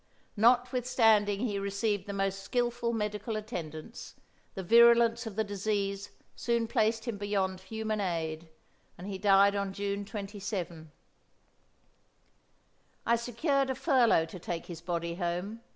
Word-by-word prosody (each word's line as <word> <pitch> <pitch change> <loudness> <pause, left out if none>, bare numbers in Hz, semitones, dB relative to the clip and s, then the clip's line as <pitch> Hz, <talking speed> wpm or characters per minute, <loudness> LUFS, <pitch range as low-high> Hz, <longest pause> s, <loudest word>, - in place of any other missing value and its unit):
Notwithstanding 230 -3 +3
he 210 -5 -1
received 200 0 -1
the - - -4
most 195 0 -2
skillful 240 +1 -1
medical 210 0 -3
attendance, 195 -2 -7 0.4
the 190 - -4
virulence 235 +2 +5
of 210 - -7
the 220 - +1
disease 200 -1 -2 0.3
soon 235 -1 0
placed 225 -1 +1
him 230 -5 -4
beyond 195 -2 -1
human 215 +2 -3
aid, 165 -3 -3 0.5
and 180 - -9
he 195 -1 -5
died 200 0 +5
on 200 -1 -2
June 200 0 -3
27. 195 -6 -6 2.1
I 235 - +4
secured 265 +4 0
a 265 - -1
furlough 255 - +3
to 180 +3 -10
take 170 -1 -5
his 170 -2 -8
body 170 -1 -3
home. 180 +5 -3
205 Hz, 130 wpm, -30 LUFS, 190-230 Hz, 2.1 s, virulence